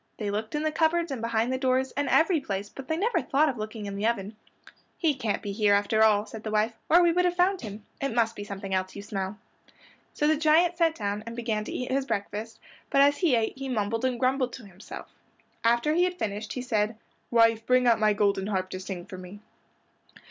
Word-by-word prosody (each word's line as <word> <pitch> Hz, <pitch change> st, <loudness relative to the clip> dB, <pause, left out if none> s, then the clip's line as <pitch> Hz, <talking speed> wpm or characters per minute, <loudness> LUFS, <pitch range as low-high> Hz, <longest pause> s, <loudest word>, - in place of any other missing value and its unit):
They 205 Hz, -2 st, -3 dB
looked 215 Hz, +5 st, -3 dB
in 300 Hz, -, -1 dB
the 310 Hz, -, +1 dB
cupboards 330 Hz, +1 st, +1 dB
and 260 Hz, -4 st, -4 dB
behind 230 Hz, +2 st, 0 dB
the 260 Hz, -, -1 dB
doors, 260 Hz, 0 st, +1 dB
and 285 Hz, 0 st, -2 dB
every 325 Hz, 0 st, +4 dB
place, 200 Hz, -6 st, -4 dB
but 270 Hz, -1 st, -10 dB
they 320 Hz, -, -1 dB
never 400 Hz, -2 st, +1 dB
thought 295 Hz, +3 st, +2 dB
of 250 Hz, -5 st, -4 dB
looking 215 Hz, 0 st, -5 dB
in 200 Hz, -1 st, -5 dB
the 205 Hz, +2 st, 0 dB
oven. 215 Hz, -2 st, -2 dB, 0.6 s
"He 320 Hz, -4 st, +2 dB
can't 235 Hz, -6 st, -2 dB
be 205 Hz, -, -3 dB
here 205 Hz, 0 st, +3 dB
after 205 Hz, +2 st, +2 dB
all," 210 Hz, -1 st, +4 dB
said 220 Hz, -, -9 dB
the 220 Hz, -, -4 dB
wife, 215 Hz, +2 st, +1 dB, 0.2 s
"or 345 Hz, +2 st, +6 dB
we 340 Hz, -, +5 dB
would 360 Hz, +2 st, +2 dB
have 355 Hz, 0 st, +1 dB
found 365 Hz, +2 st, +2 dB
him. 210 Hz, -2 st, -8 dB, 0.2 s
It 275 Hz, -, -1 dB
must 230 Hz, -1 st, +2 dB
be 205 Hz, -, -6 dB
something 195 Hz, -1 st, -6 dB
else 185 Hz, 0 st, -1 dB
you 200 Hz, -, -7 dB
smell." 195 Hz, 0 st, -4 dB, 0.8 s
So 295 Hz, -, 0 dB
the 310 Hz, +1 st, +3 dB
giant 325 Hz, +3 st, +4 dB
sat 330 Hz, -2 st, +2 dB
down 205 Hz, -1 st, -3 dB
and 230 Hz, -, -6 dB
began 225 Hz, -3 st, -2 dB
to -, -, -6 dB
eat 250 Hz, 0 st, -4 dB
his 270 Hz, 0 st, 0 dB
breakfast, 210 Hz, +2 st, -4 dB, 0.3 s
but 275 Hz, -, +4 dB
as 285 Hz, +1 st, +4 dB
he 330 Hz, -9 st, +3 dB
ate 225 Hz, -1 st, 0 dB
he 270 Hz, -1 st, -4 dB
mumbled 225 Hz, 0 st, -1 dB
and 255 Hz, -2 st, 0 dB
grumbled 255 Hz, 0 st, +1 dB
to 255 Hz, -, -9 dB
himself. 190 Hz, 0 st, -10 dB, 0.6 s
After 235 Hz, +6 st, +3 dB
he 350 Hz, +2 st, +3 dB
had 360 Hz, 0 st, -3 dB
finished 210 Hz, -, -3 dB
he 255 Hz, -, -4 dB
said, 215 Hz, -3 st, 0 dB, 0.3 s
"Wife, 230 Hz, -1 st, +4 dB
bring 255 Hz, 0 st, +4 dB
out 235 Hz, -2 st, +4 dB
my 215 Hz, -1 st, +4 dB
golden 200 Hz, -1 st, +1 dB
harp 190 Hz, -2 st, -2 dB
to 185 Hz, -, -4 dB
sing 185 Hz, -2 st, -6 dB
for 190 Hz, -2 st, -9 dB
me." 185 Hz, +3 st, -10 dB
230 Hz, 235 wpm, -27 LUFS, 205-275 Hz, 0.8 s, or